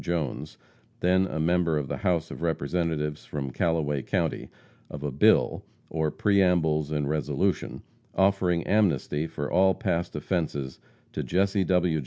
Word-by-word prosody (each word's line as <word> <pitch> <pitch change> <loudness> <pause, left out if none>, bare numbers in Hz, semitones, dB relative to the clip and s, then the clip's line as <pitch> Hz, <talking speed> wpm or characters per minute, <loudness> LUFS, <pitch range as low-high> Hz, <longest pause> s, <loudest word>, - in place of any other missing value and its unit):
Jones, 85 -6 -3 0.4
then 95 +1 +3
a 80 - -4
member 85 0 +2
of 75 -2 -2
the - - -3
House 90 -5 0
of - - -8
Representatives 80 -1 -1
from 70 -3 -5
Callaway 75 -2 0
county, - - -2 0.4
of 70 - -7
a 75 - -2
bill, 70 - +3 0.3
or 80 -1 0
preambles 85 -6 +2
and 75 -2 -1
resolution, 75 0 -1 0.3
offering 95 -3 +2
amnesty 90 -7 +1
for 75 -2 -5
all 95 0 +4
past 85 -1 -2
offenses 75 -4 -2 0.3
to - - -2
Jesse 95 +1 +1
W. 90 -3 +2
80 Hz, 140 wpm, -27 LUFS, 75-90 Hz, 0.4 s, all